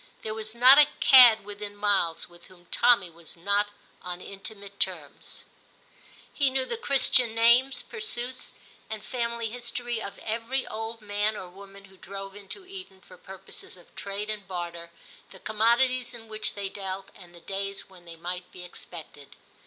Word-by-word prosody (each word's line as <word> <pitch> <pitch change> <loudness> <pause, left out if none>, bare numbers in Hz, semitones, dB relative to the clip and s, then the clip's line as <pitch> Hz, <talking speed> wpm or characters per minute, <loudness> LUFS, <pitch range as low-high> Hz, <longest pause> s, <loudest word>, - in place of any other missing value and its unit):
There 215 - -3
was 220 0 -7
not 255 +4 +9
a 295 - +8
*cad' 240 -6 +8
within 205 0 -8
miles 200 -5 +1
with 175 0 -18
whom 180 -2 -19
Tommy 205 -8 +5
was 165 0 -13
not 200 +4 +1 0.3
on 180 0 -5
intimate 200 +1 -9
terms; - - -2 0.9
he 285 -2 +2
knew 260 0 0
the 470 - -4
Christian 260 - +3
names, 240 +4 +4
pursuits, 255 - -4 0.4
and 215 -1 -5
family 235 -2 -2
history 240 -1 -4
of 200 - -7
every 230 +4 -2
old 225 +1 -5
man 210 +1 -1
or 185 - -7
woman 195 +1 -14
who 190 -1 -19
drove 195 +1 -8
into 205 - -8
Eton 370 - -11
for - - -16
purposes 190 +1 -11
of 175 - -20
trade 205 +2 -4
and 205 -3 -6
barter, 170 -2 -6 0.4
the 190 - -13
commodities 235 +5 +1
in 225 -1 -11
which 215 0 0
they 200 -1 -3
dealt, 195 0 -6
and 175 -3 -15
the - - -13
days 195 +2 -5
when 180 -2 -17
they 170 -1 -11
might 180 +2 -6
be 180 - -9
expected. 160 -5 -10
205 Hz, 165 wpm, -27 LUFS, 190-235 Hz, 0.9 s, not